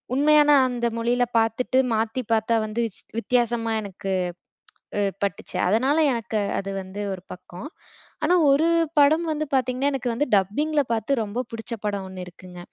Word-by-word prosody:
உண்மையான 295 +1 +5 0.2
அந்த 240 -1 -1
மொழியில 240 +2 +1
பார்த்துட்டு 225 +3 +1 0.2
மாத்தி 225 +3 -1
பார்த்தா 225 +1 +2
வந்து 215 +2 -2
ஸ் - - -17 0.2
வித்தியாசமா 235 -1 0
எனக்கு 195 -1 -5 0.9
அ - - +2 0.2
பட்டுச்சு. 200 -2 -3
அதனால 260 +9 +2 0.2
எனக்கு 220 -2 -2 0.2
அது 195 0 -5
வந்து 190 +2 -7
ஒரு 185 -1 -9
பக்கம். 180 +6 -10 0.6
ஆனா 345 +4 +4 0.2
ஒரு 295 +4 +3 0.3
படம் 310 +4 +4
வந்து 310 0 -2
பார்த்தீங்கன்னா, 255 +2 +1
எனக்கு 255 -2 -2
வந்து 295 +5 0
டப்பிங்ல 290 +11 +1
பார்த்து 230 +3 0
ரொம்ப 215 +3 -4
புடிச்ச 230 +1 -6
படம் 200 -2 -2
1 185 -1 -7
இருக்குங்க. 180 0 -12
230 Hz, 150 wpm, -24 LUFS, 205-270 Hz, 0.9 s, உண்மையான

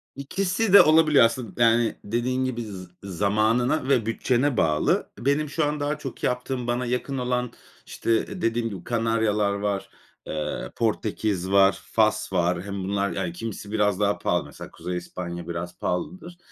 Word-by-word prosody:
İkisi 185 - -1
de 200 - +11
olabiliyor 155 -4 +6
aslında. 115 0 -1
Yani, 115 0 +3
dediğin 125 +4 -1
gibi 125 -2 -3
z 95 -4 -8 0.2
zamanına 110 - +1
ve 125 -6 +3
bütçene 125 +3 +1
bağlı. 75 -1 +2
Benim 140 +4 +1
şu 155 +1 0
an 150 +1 -1
daha 145 +1 -1
çok 135 -5 -8
yaptığım, 125 0 -2
bana 120 +1 0
yakın 125 +3 -2
olan, 125 -1 -1 0.3
işte, 115 +10 -1
dediğim 115 -2 0
gibi 95 -4 -8
Kanaryalar 110 -3 +1
var. 100 -1 -2 0.4
Eee, 75 -4 -4
Portekiz 105 -4 -1
var. 100 0 +5
Fas - - +2
var. 90 0 +1
Hem 100 -1 -5
bunlar, 100 +1 0
yani, 90 -3 -3
kimisi 100 +1 -6
biraz 105 -3 +1
daha 105 0 +2
pahalı. - - 0
Mesela - - -10
Kuzey 90 0 -5
İspanya 85 -1 -6
biraz 85 +1 -5
pahalıdır. 175 - -4
115 Hz, 155 wpm, -25 LUFS, 100-130 Hz, 0.4 s, de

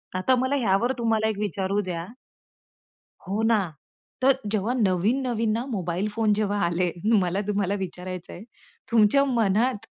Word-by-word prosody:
आता 220 +8 +2
मला 260 +3 0
ह्यावर 230 -1 +2
तुम्हाला 225 -2 +1
एक 215 - -3
विचारू 200 0 -1
द्या? 175 -3 -4 1.2
हो 205 +3 -1
ना. 225 -1 +4 0.6
तर 265 0 +4
जेव्हा 215 +2 0
नवीन-नवीन 225 +2 +1
ना, 230 +4 -1
मोबाईल 185 -5 -2
फोन 215 0 +1
जेव्हा 205 -1 0
आले, 175 +1 0 0.3
मला 185 +1 0
तुम्हाला 200 -2 0
विचारायचंय, 180 -1 -6 0.5
तुमच्या 230 +5 +5
मनात 230 -2 +1
210 Hz, 130 wpm, -25 LUFS, 190-230 Hz, 1.2 s, तुमच्या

